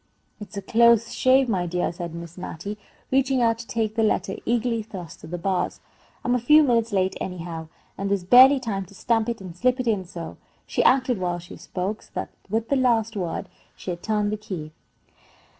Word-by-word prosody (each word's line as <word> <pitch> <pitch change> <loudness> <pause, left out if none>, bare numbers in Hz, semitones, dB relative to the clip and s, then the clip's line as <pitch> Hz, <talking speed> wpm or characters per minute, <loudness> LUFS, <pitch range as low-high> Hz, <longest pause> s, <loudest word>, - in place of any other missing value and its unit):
"It's 210 -1 -9
a 200 - -4
close 235 +1 +4
shave, 260 +1 +4
my 185 -6 0
dear," 175 +1 -1
said 170 -1 -6
Miss 170 0 -8
Mattie, 195 +3 -6 0.3
reaching 265 0 +2
out 230 -1 +2
to 235 - -8
take 220 -2 -1
the 225 - 0
letter 195 -3 +1
eagerly 235 -1 +1
thrust 190 -6 -9
through - - -11
the 175 - -3
bars. 185 +1 -1 0.5
"I'm 245 - +2
a 250 - +2
few 300 +6 +6
minutes 230 -4 +2
late, 190 -1 +1
anyhow, 170 -3 -5 0.3
and 200 0 -1
there's 200 -2 0
barely 260 +8 +8
time 200 -6 -3
to 200 - -16
stamp 225 +2 +1
it 230 -3 -4
and 180 -3 -8
slip 250 +6 +1
it 255 - -1
in, 205 -5 +1
so!" 170 -2 -8 0.3
She - - 0
acted 255 -4 +3
while 175 -1 -1
she 175 0 -10
spoke, 195 +4 -4
so - - -19
that - - -3 0.2
with 225 +2 -1
the 280 - +3
last 230 -3 +2
word 175 -5 -3 0.3
she 185 - -5
had 175 0 -6
turned 210 -1 0
the 215 - -2
key. 180 -7 -6
210 Hz, 210 wpm, -24 LUFS, 180-235 Hz, 0.5 s, barely